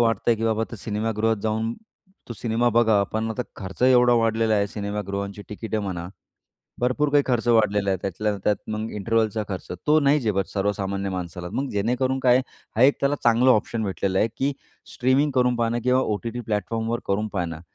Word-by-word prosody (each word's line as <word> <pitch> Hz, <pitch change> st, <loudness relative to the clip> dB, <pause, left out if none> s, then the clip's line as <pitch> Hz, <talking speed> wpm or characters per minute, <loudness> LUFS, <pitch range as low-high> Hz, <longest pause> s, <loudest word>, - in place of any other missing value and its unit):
वाटतं 115 Hz, -3 st, +1 dB
आहे, 115 Hz, -, +3 dB
की 115 Hz, -, -3 dB
बाबा 110 Hz, -1 st, +1 dB
आता 115 Hz, -, -6 dB
सिनेमागृहात 110 Hz, +1 st, -1 dB
जाऊन 110 Hz, +1 st, -1 dB, 0.6 s
तू -, -, -4 dB
सिनेमा 115 Hz, +2 st, 0 dB
बघावा. 110 Hz, -3 st, +4 dB
पण 110 Hz, +2 st, -3 dB
आता 125 Hz, +3 st, -2 dB
खर्च 95 Hz, +4 st, -7 dB
एवढा 125 Hz, -1 st, +6 dB
वाढलेला 115 Hz, -1 st, +2 dB
आहे, 100 Hz, -1 st, +2 dB
सिनेमागृहांची 100 Hz, -1 st, -4 dB
तिकिटे 110 Hz, +1 st, -4 dB
म्हणा, 90 Hz, -4 st, -4 dB, 0.7 s
भरपूर 130 Hz, +4 st, +1 dB
काही 145 Hz, 0 st, +4 dB
खर्च 120 Hz, -2 st, 0 dB
वाढलेला 105 Hz, -3 st, +3 dB
आहे. 95 Hz, -, +1 dB
त्यातल्या 105 Hz, +2 st, -1 dB
त्यात 105 Hz, -2 st, +3 dB
मग 110 Hz, +1 st, -3 dB
इंटरवलचा 110 Hz, +1 st, 0 dB
खर्च. 95 Hz, -2 st, -6 dB, 0.2 s
तो 155 Hz, +1 st, +5 dB
नाही 140 Hz, +1 st, +3 dB
झेपत 100 Hz, -5 st, 0 dB
सर्वसामान्य 100 Hz, -1 st, -1 dB
माणसाला. 90 Hz, -1 st, -5 dB
मग 140 Hz, +1 st, -2 dB
जेणेकरून 125 Hz, +6 st, 0 dB
काय, 125 Hz, -1 st, +5 dB, 0.4 s
हा 120 Hz, -, +4 dB
एक 140 Hz, +2 st, +6 dB
त्याला 140 Hz, +1 st, +2 dB
चांगलं 120 Hz, +2 st, +5 dB
ऑप्शन 115 Hz, 0 st, +1 dB
भेटलेलं 95 Hz, -1 st, -1 dB
आहे, 110 Hz, -, +3 dB
की 140 Hz, +2 st, 0 dB, 0.4 s
स्ट्रीमिंग 130 Hz, +4 st, +2 dB
करून 125 Hz, -1 st, +2 dB
पाहणं 115 Hz, 0 st, 0 dB
किंवा 125 Hz, +1 st, +3 dB
ओ-टी-टी 115 Hz, +1 st, -2 dB
प्लॅटफॉर्मवर 115 Hz, +1 st, -2 dB
करून 105 Hz, +2 st, 0 dB
पाहणं. 85 Hz, -4 st, -3 dB
110 Hz, 180 wpm, -24 LUFS, 100-120 Hz, 0.7 s, एवढा